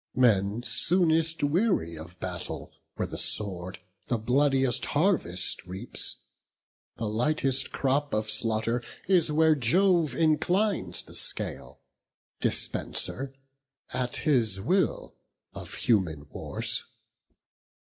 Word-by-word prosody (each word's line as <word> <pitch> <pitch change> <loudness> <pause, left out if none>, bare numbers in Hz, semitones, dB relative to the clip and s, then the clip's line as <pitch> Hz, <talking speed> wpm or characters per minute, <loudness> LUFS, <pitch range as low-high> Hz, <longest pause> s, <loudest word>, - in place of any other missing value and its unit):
Men 110 -3 +3
soonest 165 0 +2
weary 150 - +1
of 85 +3 -11
battle, 90 -2 -6 0.2
where - - -2
the - - -6
sword 95 -3 -2 0.3
The 120 - +1
bloodiest 135 +2 +2
harvest 145 - +1
reaps; 95 +2 -4 0.8
the 115 - -3
lightest 135 +4 +1
crop 140 +2 0
Of 110 0 0
slaughter 115 +2 0 0.3
is 175 -5 +3
where 160 +1 +5
Jove 165 - +3
inclines 160 - +1
the - - -14
scale, 60 - -3 0.6
Dispenser, 135 +1 -1 0.6
at 125 -1 -1
his 120 -10 +2
will, 180 - 0 0.4
of - - -8
human 90 -11 +1
wars. - - -2
130 Hz, 100 wpm, -28 LUFS, 105-160 Hz, 0.8 s, where